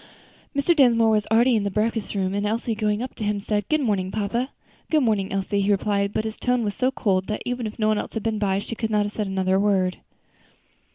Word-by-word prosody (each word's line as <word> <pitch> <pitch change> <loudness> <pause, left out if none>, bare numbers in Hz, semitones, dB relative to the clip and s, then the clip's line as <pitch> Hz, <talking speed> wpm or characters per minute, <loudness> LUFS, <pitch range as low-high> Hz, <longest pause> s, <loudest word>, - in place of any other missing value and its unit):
Mr. 285 +5 +3
Dinsmore 230 -6 +5
was 210 -1 +1
already 235 +3 +4
in 215 - +2
the 200 - 0
breakfast 215 +1 -1
room, 190 -1 0
and 205 0 -1
Elsie, 225 +2 -1
going 210 +1 0
up 255 - -6
to 220 - -6
him, 205 0 0
said, 205 0 -2
"Good 310 -1 +2
morning, 200 -7 0
papa." 220 +6 -2 0.4
"Good 310 -3 +3
morning, 210 -5 +1
Elsie," 195 +1 0
he 195 - 0
replied, 200 0 +1
but 215 - -1
his 220 0 -4
tone 250 -1 0
was 205 -2 -1
so 255 +3 +1
cold 190 -7 0
that 215 - -3
even 245 -2 -2
if 210 - -8
no 215 -1 +1
one 215 -1 +2
else - - -6
had 220 - -3
been 220 -2 -1
by, 195 -2 +1
she 200 - -4
could 225 -1 -3
not 210 -1 +2
have 205 - -4
said 210 -2 -2
another 190 0 +1
word. 190 -3 +1
210 Hz, 245 wpm, -24 LUFS, 200-230 Hz, 0.4 s, Dinsmore